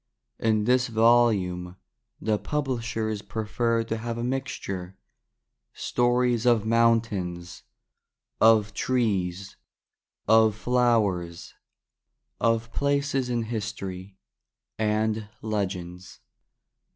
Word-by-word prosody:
In 110 Hz, -2 st, +2 dB
this 125 Hz, +2 st, +2 dB
volume 110 Hz, -6 st, +2 dB, 0.4 s
the 110 Hz, -1 st, 0 dB
Publishers 115 Hz, -7 st, -2 dB
prefer 115 Hz, +2 st, -1 dB
to 115 Hz, 0 st, -3 dB
have 115 Hz, +1 st, -4 dB
a 120 Hz, -, -3 dB
mixture 110 Hz, -8 st, -4 dB, 0.4 s
— -, -, -56 dB, 0.2 s
stories 120 Hz, -1 st, +2 dB
of 115 Hz, -3 st, +3 dB
Mountains, 110 Hz, -7 st, 0 dB, 0.8 s
of 110 Hz, -1 st, +5 dB
Trees, 100 Hz, -7 st, -1 dB, 0.7 s
of 110 Hz, -1 st, +5 dB
Flowers, 110 Hz, -9 st, 0 dB, 0.9 s
of 115 Hz, 0 st, 0 dB
Places 140 Hz, -2 st, 0 dB
in 120 Hz, -1 st, 0 dB
History, 100 Hz, -4 st, -5 dB, 0.6 s
and 110 Hz, 0 st, 0 dB
Legends. 95 Hz, -4 st, -4 dB
110 Hz, 85 wpm, -26 LUFS, 100-120 Hz, 0.9 s, of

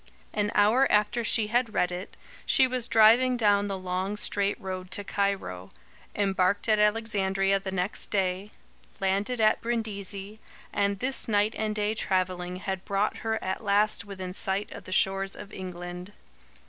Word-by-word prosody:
An 210 Hz, -1 st, 0 dB
hour 225 Hz, +6 st, +4 dB
after 210 Hz, +3 st, +2 dB
she 225 Hz, -1 st, +2 dB
had 230 Hz, 0 st, 0 dB
read 180 Hz, -, +2 dB
it, 180 Hz, +2 st, -7 dB, 0.3 s
she 265 Hz, -, +5 dB
was 250 Hz, -2 st, -2 dB
driving 240 Hz, +3 st, +5 dB
down 205 Hz, -3 st, +3 dB
the 195 Hz, -1 st, -3 dB
long 185 Hz, +2 st, -3 dB
straight 200 Hz, -1 st, 0 dB
road 185 Hz, -1 st, -6 dB
to 205 Hz, -, -4 dB
Cairo; 195 Hz, -, -2 dB, 0.5 s
embarked 195 Hz, 0 st, +1 dB
at 215 Hz, -1 st, +3 dB
Alexandria 195 Hz, -3 st, +1 dB
the 190 Hz, 0 st, -5 dB
next 190 Hz, +2 st, -2 dB
day; 190 Hz, 0 st, -1 dB, 0.5 s
landed 200 Hz, +5 st, 0 dB
at 215 Hz, -1 st, +3 dB
Brindisi, 210 Hz, -3 st, -4 dB, 0.3 s
and 200 Hz, 0 st, +1 dB
this 260 Hz, +6 st, +1 dB
night 210 Hz, 0 st, +2 dB
and 215 Hz, -1 st, -2 dB
day 210 Hz, 0 st, 0 dB
travelling 185 Hz, -3 st, -1 dB
had 190 Hz, 0 st, -4 dB
brought 200 Hz, +1 st, -1 dB
her 225 Hz, -1 st, -2 dB
at 190 Hz, +4 st, -3 dB
last 205 Hz, +1 st, +2 dB
within 190 Hz, -2 st, -7 dB
sight 195 Hz, +2 st, 0 dB
of -, -, -10 dB
the -, -, -9 dB
shores 195 Hz, +1 st, +1 dB
of 205 Hz, -, -11 dB
England. 180 Hz, +1 st, -7 dB
200 Hz, 160 wpm, -27 LUFS, 190-215 Hz, 0.5 s, she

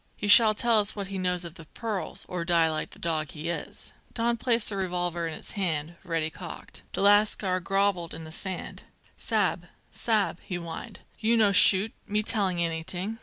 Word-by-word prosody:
"He 205 Hz, -, -4 dB
shall 215 Hz, +1 st, +8 dB
tell 230 Hz, 0 st, +3 dB
us 205 Hz, 0 st, 0 dB
what 200 Hz, -2 st, -5 dB
he 195 Hz, -1 st, -5 dB
knows 180 Hz, -1 st, 0 dB
of 170 Hz, -, -8 dB
the 165 Hz, -, -13 dB
pearls, 215 Hz, +4 st, -5 dB
or 180 Hz, -2 st, -4 dB
die 170 Hz, -1 st, +3 dB
like 155 Hz, -, -3 dB
the -, -, -15 dB
dog 155 Hz, -3 st, -1 dB
he 155 Hz, +3 st, -6 dB
is." 170 Hz, -, -4 dB, 0.2 s
Don 235 Hz, 0 st, 0 dB
placed 235 Hz, -1 st, 0 dB
the 205 Hz, -, -3 dB
revolver 175 Hz, -3 st, -2 dB
in 160 Hz, -, -5 dB
his -, -, -5 dB
hand, 170 Hz, -5 st, -2 dB
ready 165 Hz, -2 st, -2 dB
cocked. -, -, -10 dB
The -, -, -2 dB
lascar 205 Hz, -2 st, +3 dB
grovelled 195 Hz, -2 st, -1 dB
in 160 Hz, -, -9 dB
the 160 Hz, -, -10 dB
sand. 185 Hz, +3 st, -4 dB, 0.3 s
"Sa'b, -, -, -1 dB, 0.2 s
sa'b!" 215 Hz, -6 st, -1 dB
he 180 Hz, -, -6 dB
whined, 170 Hz, -2 st, -7 dB, 0.2 s
"you 230 Hz, +1 st, +2 dB
no 210 Hz, -3 st, +4 dB
shoot, 200 Hz, +2 st, +7 dB
me 210 Hz, +1 st, 0 dB
telling 200 Hz, -5 st, +1 dB
anyting." 175 Hz, +6 st, -2 dB
185 Hz, 190 wpm, -27 LUFS, 170-210 Hz, 0.3 s, shall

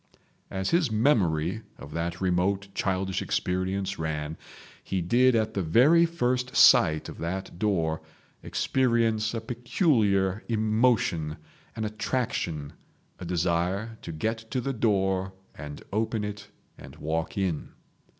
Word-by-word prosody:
As 95 Hz, 0 st, -2 dB
his 170 Hz, -5 st, +3 dB
memory 100 Hz, -, +2 dB, 0.2 s
of 70 Hz, -, -11 dB
that 85 Hz, +1 st, -3 dB
remote 95 Hz, +2 st, 0 dB
childish 95 Hz, 0 st, -1 dB
experience 95 Hz, +1 st, -1 dB
ran, 80 Hz, -1 st, -3 dB, 0.5 s
he 95 Hz, -, -2 dB
did 120 Hz, +8 st, +3 dB
at 110 Hz, -1 st, +1 dB
the 100 Hz, -, -1 dB
very 140 Hz, -, +5 dB
first 125 Hz, -6 st, -1 dB
sight 80 Hz, 0 st, +6 dB
of -, -, -9 dB
that 90 Hz, +1 st, -4 dB
door 85 Hz, -7 st, 0 dB, 0.4 s
experience 115 Hz, -4 st, +1 dB
a 115 Hz, -, -2 dB
peculiar 110 Hz, -, +1 dB
emotion, 110 Hz, -8 st, +1 dB, 0.4 s
an 110 Hz, -1 st, -2 dB
attraction, 105 Hz, -, -2 dB, 0.5 s
a -, -, -6 dB
desire 90 Hz, +6 st, -1 dB
to 85 Hz, -, -6 dB
get 110 Hz, +9 st, -2 dB
to 130 Hz, -, -1 dB
the 135 Hz, +2 st, -2 dB
door 95 Hz, -4 st, +1 dB, 0.2 s
and 75 Hz, -1 st, -8 dB
open 110 Hz, 0 st, 0 dB
it 105 Hz, 0 st, -6 dB, 0.3 s
and -, -, -11 dB
walk 80 Hz, +4 st, -3 dB
in. 90 Hz, -6 st, -1 dB
100 Hz, 125 wpm, -27 LUFS, 85-115 Hz, 0.5 s, sight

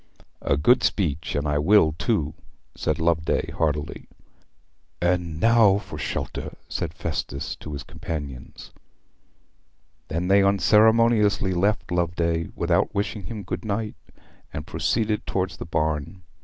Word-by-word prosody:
"' -, -, -43 dB
'A 70 Hz, -, +1 dB
good 120 Hz, -, +4 dB
speech. 85 Hz, -5 st, -1 dB
And 70 Hz, +1 st, 0 dB
I 75 Hz, 0 st, +1 dB
will, 80 Hz, 0 st, +5 dB
too,' 80 Hz, -4 st, -1 dB, 0.4 s
said 75 Hz, -, -1 dB
Loveday 80 Hz, 0 st, +1 dB
heartily. 75 Hz, -2 st, -2 dB, 0.9 s
'And 85 Hz, -2 st, 0 dB
now 115 Hz, -2 st, +5 dB
for 105 Hz, -, -8 dB
shelter,' -, -, -4 dB
said 80 Hz, -, -3 dB
Festus 80 Hz, -4 st, -4 dB
to 75 Hz, -, -9 dB
his 70 Hz, -, -5 dB
companions. 70 Hz, -6 st, -7 dB, 1.4 s
They 80 Hz, -, -4 dB
then 95 Hz, +3 st, +4 dB
unceremoniously 105 Hz, 0 st, +4 dB
left 100 Hz, +3 st, 0 dB
Loveday, 85 Hz, -1 st, 0 dB
without -, -, +1 dB
wishing 100 Hz, 0 st, -2 dB
him 110 Hz, -4 st, -6 dB
good 90 Hz, 0 st, -4 dB
night, 105 Hz, 0 st, -2 dB, 0.6 s
and -, -, -6 dB
proceeded 110 Hz, -2 st, -1 dB
towards 95 Hz, 0 st, -1 dB
the -, -, -7 dB
barn. 80 Hz, +3 st, -2 dB
90 Hz, 130 wpm, -24 LUFS, 80-105 Hz, 1.4 s, will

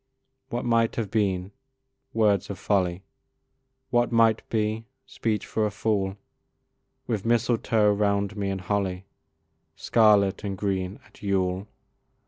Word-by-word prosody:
What 120 Hz, +1 st, -3 dB
might 115 Hz, -1 st, +2 dB
have 110 Hz, -4 st, -3 dB
been! 95 Hz, -4 st, 0 dB, 0.6 s
words 105 Hz, -4 st, +2 dB
of 100 Hz, -, -5 dB
folly; 95 Hz, -2 st, 0 dB, 0.9 s
What 120 Hz, 0 st, +2 dB
might 115 Hz, -1 st, +4 dB
be! 110 Hz, 0 st, -1 dB, 0.2 s
speech 110 Hz, -2 st, -2 dB
for 110 Hz, -, -1 dB
a 105 Hz, -, +2 dB
fool; 100 Hz, -2 st, -1 dB, 0.9 s
With 110 Hz, -4 st, -2 dB
mistletoe 115 Hz, -2 st, +2 dB
round 100 Hz, 0 st, 0 dB
me, 100 Hz, -2 st, -2 dB
and 95 Hz, -1 st, -3 dB
holly, 95 Hz, -1 st, -2 dB, 0.7 s
Scarlet 105 Hz, -3 st, +3 dB
and 100 Hz, -2 st, -3 dB
green, 95 Hz, -1 st, -2 dB
at 105 Hz, -, -20 dB
Yule. 95 Hz, -1 st, 0 dB
105 Hz, 120 wpm, -26 LUFS, 95-110 Hz, 0.9 s, might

